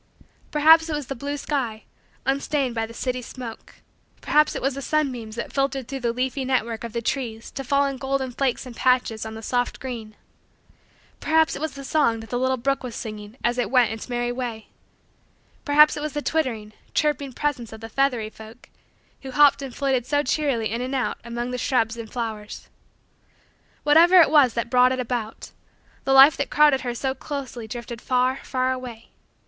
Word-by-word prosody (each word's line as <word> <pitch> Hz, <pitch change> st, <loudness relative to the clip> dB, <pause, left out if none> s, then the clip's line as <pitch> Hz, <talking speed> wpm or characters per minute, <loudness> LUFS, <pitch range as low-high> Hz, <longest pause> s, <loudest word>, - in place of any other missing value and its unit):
] -, -, -37 dB
Perhaps 320 Hz, +2 st, +6 dB
it 305 Hz, -, -1 dB
was 295 Hz, -2 st, -4 dB
the 275 Hz, -, -5 dB
blue 285 Hz, +4 st, -4 dB
sky, 255 Hz, -7 st, -3 dB, 0.4 s
unstained 275 Hz, -1 st, 0 dB
by 225 Hz, -1 st, -2 dB
the -, -, -12 dB
city 255 Hz, 0 st, -2 dB
smoke: 235 Hz, -1 st, -9 dB, 0.4 s
perhaps 300 Hz, 0 st, +2 dB
it -, -, -3 dB
was 270 Hz, +1 st, +1 dB
the 275 Hz, -, -6 dB
sunbeams 255 Hz, -8 st, -1 dB
that 235 Hz, -, -5 dB
filtered 275 Hz, -2 st, -1 dB
through 270 Hz, 0 st, -5 dB
the 240 Hz, -2 st, 0 dB
leafy 260 Hz, +3 st, -2 dB
net 255 Hz, -3 st, +1 dB
work 230 Hz, -1 st, -6 dB
of 235 Hz, -, -5 dB
the 235 Hz, -, -3 dB
trees 230 Hz, -3 st, -3 dB
to 270 Hz, -, -5 dB
fall 280 Hz, +2 st, +2 dB
in 275 Hz, -1 st, -3 dB
golden 265 Hz, 0 st, -2 dB
flakes 260 Hz, +1 st, -1 dB
and 250 Hz, -2 st, -9 dB
patches 245 Hz, -4 st, +1 dB
on 220 Hz, -, -7 dB
the 220 Hz, -, -9 dB
soft 245 Hz, +2 st, -1 dB
green: 230 Hz, -5 st, -7 dB, 1.0 s
perhaps 320 Hz, 0 st, +2 dB
it -, -, -7 dB
was 315 Hz, -, -3 dB
the 275 Hz, -, -9 dB
song 265 Hz, -5 st, +1 dB
that 225 Hz, -1 st, -11 dB
the 245 Hz, -, 0 dB
little 260 Hz, 0 st, +1 dB
brook 275 Hz, +3 st, 0 dB
was 250 Hz, -3 st, -6 dB
singing 215 Hz, 0 st, -7 dB
as 240 Hz, +1 st, +1 dB
it 245 Hz, -, 0 dB
went 250 Hz, -4 st, +4 dB
its 220 Hz, +3 st, -7 dB
merry 240 Hz, 0 st, -1 dB
way: 240 Hz, -3 st, -5 dB, 1.0 s
perhaps 300 Hz, 0 st, +6 dB
it -, -, -5 dB
was 300 Hz, -1 st, -4 dB
the 295 Hz, -, -2 dB
twittering, 230 Hz, -9 st, -2 dB, 0.2 s
chirping, 290 Hz, -3 st, 0 dB
presence 255 Hz, -4 st, -2 dB
of 220 Hz, -, -9 dB
the 225 Hz, -, -8 dB
feathery 240 Hz, -3 st, 0 dB
folk 220 Hz, +3 st, -14 dB, 0.5 s
who 270 Hz, -, -8 dB
hopped 285 Hz, +1 st, +5 dB
and 270 Hz, -3 st, -7 dB
flitted 265 Hz, -3 st, 0 dB
so 290 Hz, +1 st, +1 dB
cheerily 255 Hz, -6 st, 0 dB
in 230 Hz, +2 st, -2 dB
and 260 Hz, +2 st, -3 dB
out 255 Hz, -, -1 dB
among 240 Hz, +1 st, -4 dB
the 250 Hz, -, -3 dB
shrubs 230 Hz, -3 st, +1 dB
and 230 Hz, -2 st, -8 dB
flowers 220 Hz, -3 st, -5 dB, 1.1 s
whatever 335 Hz, +5 st, +7 dB
it 335 Hz, -, +6 dB
was 285 Hz, -6 st, +5 dB
that 235 Hz, 0 st, -2 dB
brought 250 Hz, 0 st, +5 dB
it 260 Hz, -, -1 dB
about, 235 Hz, -3 st, -4 dB, 0.5 s
the 270 Hz, -, +1 dB
life 270 Hz, +2 st, +9 dB
that 280 Hz, -, -2 dB
crowded 295 Hz, -3 st, +4 dB
her 245 Hz, -1 st, -3 dB
so 265 Hz, +2 st, -1 dB
closely 265 Hz, -4 st, -6 dB
drifted 235 Hz, +1 st, -7 dB
far, 255 Hz, +1 st, +1 dB
far, 255 Hz, -1 st, -1 dB
away. 250 Hz, -3 st, -7 dB
255 Hz, 200 wpm, -24 LUFS, 235-275 Hz, 1.1 s, life